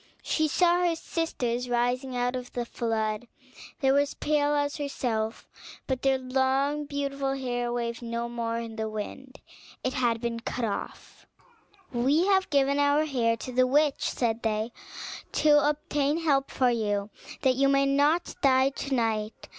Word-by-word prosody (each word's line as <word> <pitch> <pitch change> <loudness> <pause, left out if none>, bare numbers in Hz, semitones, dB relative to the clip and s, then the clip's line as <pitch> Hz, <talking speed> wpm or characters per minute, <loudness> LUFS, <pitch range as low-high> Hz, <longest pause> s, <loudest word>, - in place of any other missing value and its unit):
She 315 -1 +1
saw 350 +3 +3
her 345 -2 +2
sisters 250 -8 -2
rising 245 +2 0
out 245 +1 0
of 250 -1 -6
the 240 -1 -2
flood: 225 -1 -2 0.5
they 265 -1 +4
were 280 - +4
as 285 0 -1
pale 295 -1 +1
as 285 0 0
herself; 235 -6 -2 0.4
but 260 -2 -2
their 270 -1 +3
long 265 +3 0
beautiful 275 -1 -2
hair 245 -2 -2
waved 235 -1 -3
no 235 0 -3
more 230 -1 -3
in 230 -1 -6
the 220 0 -2
wind, 255 +5 -7 0.5
and 255 - 0
had 240 -4 +1
been 235 0 -3
cut 235 +1 -3
off. 210 - -6 0.7
"We 275 +8 +3
have 385 -1 +3
given 280 -1 +2
our 285 +2 +3
hair 235 -6 +1
to 255 - -7
the 255 +1 +3
witch," 290 +2 +2
said 230 -2 -1
they, 220 +1 -1 0.6
"to 295 -1 +4
obtain 295 +1 0
help 275 -3 +2
for 255 -2 +2
you, 205 -3 -1 0.3
that 260 - +4
you 275 +2 +3
may 275 0 +4
not 290 +5 +2
die 265 -1 +4
to 275 0 -3
night. 220 -2 -2
260 Hz, 160 wpm, -27 LUFS, 235-285 Hz, 0.7 s, they